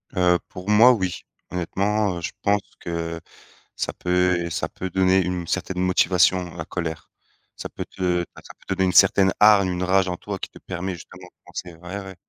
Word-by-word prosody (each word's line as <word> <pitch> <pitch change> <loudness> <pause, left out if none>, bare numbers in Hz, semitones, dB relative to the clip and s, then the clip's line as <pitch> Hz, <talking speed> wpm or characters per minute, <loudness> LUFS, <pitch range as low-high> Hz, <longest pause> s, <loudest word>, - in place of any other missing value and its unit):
Heu, 90 -1 +3
pour 90 +2 -8
moi 115 +4 +7
oui. 95 -6 -2 0.3
Honnêtement, 100 +3 0
heu, - - -6
je 80 - -3
pense 100 0 +2 0.2
que 85 -1 -4 0.6
ça - - -3
peut 90 -1 +1
ça 80 - -3
peut 95 - -6
donner 95 +1 +3
une 90 -1 -3
certaine 95 +1 -2
motivation, 90 -1 +2
la 80 -2 -5
colère. 80 -4 -5 0.5
Ça - - -7
peut - - -6
te 90 -2 -1
enfin 85 - -10
ça - - -12
peut 95 - -1
donner 95 0 +2
une 90 - +2
certaine 95 +2 +6
hargne, 105 -3 +6
une 90 0 -2
rage 95 +1 +3
en 90 - -3
toi 100 0 -6
qui - - -5
te - - -15
permet 95 +1 -4
justement 90 +1 -12
de - - -25
penser 90 0 -7
ouais, 90 +4 -7
ouais. 95 0 -9
90 Hz, 200 wpm, -23 LUFS, 90-95 Hz, 0.6 s, moi